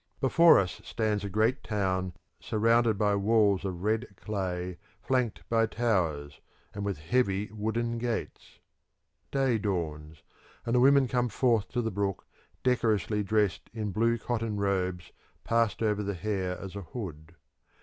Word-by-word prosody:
Before 165 +5 +6
us 90 -4 -1
stands 105 -2 -1
a 100 - -3
great 110 +7 +1
town 95 -4 -1 0.3
surrounded 115 0 +2
by 105 -1 +2
walls 100 -1 +3
of 90 -2 -4
red 110 +3 0
clay 90 -3 -4 0.2
flanked 125 -4 -1
by 115 -1 +2
towers, 80 -13 -1 0.3
and 100 - -5
with 100 -4 -2
heavy 100 +3 0
wooden 115 +2 -2
gates. 120 -1 -4 0.7
Day 135 -5 +1
dawns, 80 -6 -3 0.4
and 115 - -1
the 125 - +4
women 135 +1 +5
come 125 0 0
forth 115 -1 +2
to 120 -1 -2
the 110 - -1
brook 100 -1 -2 0.4
decorously 110 -4 +1
dressed 105 -2 0
in 105 -2 -2
blue 115 +4 +2
cotton 115 -2 -2
robes 95 -3 -1 0.3
passed 115 -2 +1
over 105 -1 +1
the 100 -1 -3
hair 95 -1 -2
as 100 0 -8
a 100 - -4
hood. 85 -5 -8
105 Hz, 145 wpm, -29 LUFS, 95-115 Hz, 0.7 s, Before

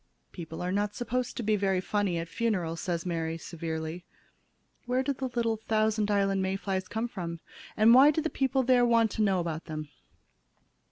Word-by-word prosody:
"People 165 -1 -7
are 180 - -1
not 205 +1 -1
supposed 245 +1 -2
to 240 - -2
be 215 0 +2
very 195 -2 +1
funny 195 -2 0
at 165 0 -3
funerals," 175 -6 -1
said 170 -1 -2
Mary, 165 -2 -2
severely. 160 0 -5 0.8
"Where 255 +1 +1
did 275 -1 -2
the 265 - -1
little 230 -2 +1
Thousand 215 -1 0
Islands 195 -1 +2
May 190 0 0
flies 190 -1 -3
come 225 +2 -2
from, 170 -7 -6 0.4
and 220 +2 +7
why 270 +4 +8
do 305 - +1
the 320 0 -2
people 265 0 +1
there 250 -1 +4
want 230 -2 +3
to - - -2
know 195 -3 +3
about 165 -2 -3
them?" 155 -2 -6
200 Hz, 185 wpm, -29 LUFS, 170-230 Hz, 0.8 s, why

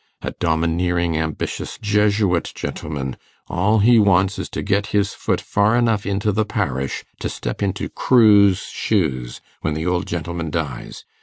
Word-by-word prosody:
A - - -3
domineering 85 +1 0
ambitious 80 -1 -3
Jesuit, 105 -3 +1
gentlemen; 70 -4 -5 0.3
all 105 +5 +2
he 115 +3 +5
wants 95 -1 +3
is - - -4
to - - -4
get 100 0 0
his 100 -1 +1
foot - - -1
far 105 +3 +1
enough 115 -4 +1
into 100 +1 0
the 110 +2 +1
parish 70 - -2 0.2
to - - -3
step - - -5
into 100 0 -1
Crewe's 105 -6 +4
shoes 65 - -2 0.2
when 80 -1 -1
the 80 +1 -3
old 90 0 0
gentleman 85 -1 -4
dies. 75 -6 -5
95 Hz, 150 wpm, -21 LUFS, 80-105 Hz, 0.3 s, he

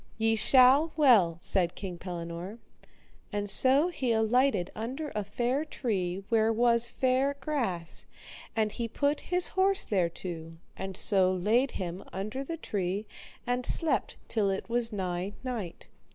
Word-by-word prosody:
Ye 225 0 +2
shall 265 +7 +5
well, 215 - +5
said 175 -3 +1
King 180 -3 -6
Pellinore. 175 +3 -6 0.7
And 205 -1 -2
so 265 - +6
he 265 -8 -2
alighted 220 -3 +2
under 265 +8 -5
a 210 - -2
fair 245 +7 -1
tree 195 - -3
where 225 -1 +3
was 235 +1 +3
fair 260 +2 +1
grass, 235 - -3 0.5
and 215 -2 +1
he 235 +2 -3
put 285 +5 0
his 360 0 0
horse 385 +1 +2
thereto, 170 -3 -3 0.2
and 190 -1 -6
so 190 -3 +2
laid 220 +9 +1
him 180 0 -5
under 215 +9 -4
the 330 +4 -5
tree 200 - -3 0.4
and 245 0 -1
slept 325 +5 +2
till 210 -3 0
it 195 0 -3
was 235 0 0
nigh 185 -1 -3
night. 230 -10 -6
220 Hz, 140 wpm, -29 LUFS, 190-260 Hz, 0.7 s, so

